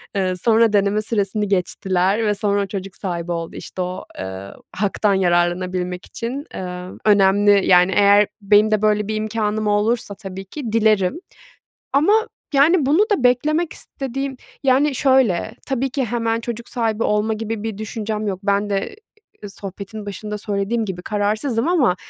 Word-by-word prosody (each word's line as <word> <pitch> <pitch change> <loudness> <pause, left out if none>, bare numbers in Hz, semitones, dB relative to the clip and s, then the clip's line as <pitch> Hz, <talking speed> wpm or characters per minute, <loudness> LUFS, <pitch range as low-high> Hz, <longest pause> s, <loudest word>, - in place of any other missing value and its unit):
eee, 185 -2 0
sonra 225 +3 +3
deneme 205 +1 +2
süresini 210 -1 -1
geçtiler 190 +2 0
ve 210 -1 +1
sonra 200 -1 0
çocuk 195 -1 -6
sahibi 175 -3 -4
oldu, 165 -1 -4
işte, 185 - -6
o, 180 0 -4 0.2
ııı, 95 +1 -7 0.2
haktan 205 +1 +1
yararlanabilmek 180 0 0
için, 260 +5 -5
eee, 180 -1 -5 0.2
önemli. 200 0 +4
Yani, 180 +1 +5
eğer 205 0 +5
benim 210 +2 +4
de 215 -1 +2
böyle 210 -1 +2
bir 215 - -2
imkânım 215 0 -1
olursa 210 0 0
tabii 195 -1 -8
ki 235 +3 -6
dilerim 215 -2 +2 0.8
ama, 305 +9 +4 0.4
yani, 295 +3 +4
bunu 295 +7 +3
da 285 -11 +1
beklemek 305 +7 +2
istediğim, 270 0 -5 0.3
yani, 270 +2 +3
şöyle, 260 -10 +2
tabii 270 0 -1
ki 265 0 -1
hemen 230 0 -1
çocuk 235 0 -6
sahibi 225 -2 -1
olma 210 +1 +1
gibi 220 0 -4
bir 220 -3 -4
düşüncem 215 0 -4
yok. 190 -2 -2
Ben 200 0 +1
de, 200 - -2 0.5
ııı, 205 - -6
sohbetin 200 +2 -8
başında 210 +1 -5
söylediğim 210 +3 -1
gibi 185 -3 -5
kararsızım 215 - -1
ama 285 - +3
210 Hz, 150 wpm, -20 LUFS, 195-230 Hz, 0.8 s, Yani